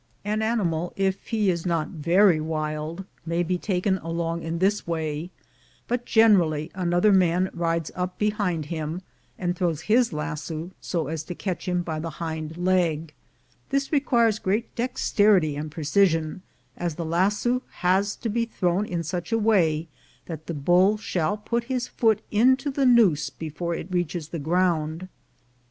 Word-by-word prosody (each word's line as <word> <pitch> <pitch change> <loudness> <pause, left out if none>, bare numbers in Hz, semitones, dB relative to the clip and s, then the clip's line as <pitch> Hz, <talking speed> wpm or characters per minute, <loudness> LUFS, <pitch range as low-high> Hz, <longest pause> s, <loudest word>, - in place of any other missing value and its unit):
An 215 +1 0
animal, 180 -7 0
if 195 0 -1
he 215 -4 +2
is 170 -2 -3
not 165 -4 0
very 175 +1 +3
wild, 155 +3 -3 0.2
may 170 +1 0
be 180 +1 -1
taken 190 0 0
along 165 0 -3
in 165 +1 -3
this 195 +3 +1
way, 160 0 -2 0.6
but 240 0 -2
generally 175 -9 +4
another 180 +2 +2
man 185 0 +3
rides 165 -2 -1
up 180 0 -3
behind 205 -7 0
him, 160 +3 -4 0.3
and 180 -1 -1
throws 170 -4 -1
his 235 +5 +3
lasso 155 +2 -4
so 170 -4 -2
as 155 +2 -3
to 180 - -6
catch 185 -1 -4
him 180 -1 0
by 160 -2 -3
the 165 +1 -4
hind 160 -1 -4
leg. 170 -4 +1 0.6
This 275 0 0
requires 235 -7 +3
great 210 +5 -1
dexterity 210 - +2
and 150 +1 -4
precision, 160 +1 +1 0.3
as 170 -3 -3
the 170 - -4
lasso 205 +9 +1 0.2
has 195 +3 +3
to 230 - -4
be 230 +2 0
thrown 190 -2 0
in 170 -2 -2
such 175 +5 -4
a 225 - +3
way 170 -8 +2 0.4
that 160 -2 -8
the 170 - -3
bull 180 +8 +4
shall 195 -1 -1
put 235 +3 -2
his 255 -1 -2
foot 220 -2 +1
into 260 +6 +3
the 270 -1 +2
noose 185 - +4
before 160 +3 -4
it 170 +3 -7
reaches 175 -3 -2
the 165 - -4
ground. 165 +1 0
175 Hz, 160 wpm, -25 LUFS, 160-210 Hz, 0.6 s, generally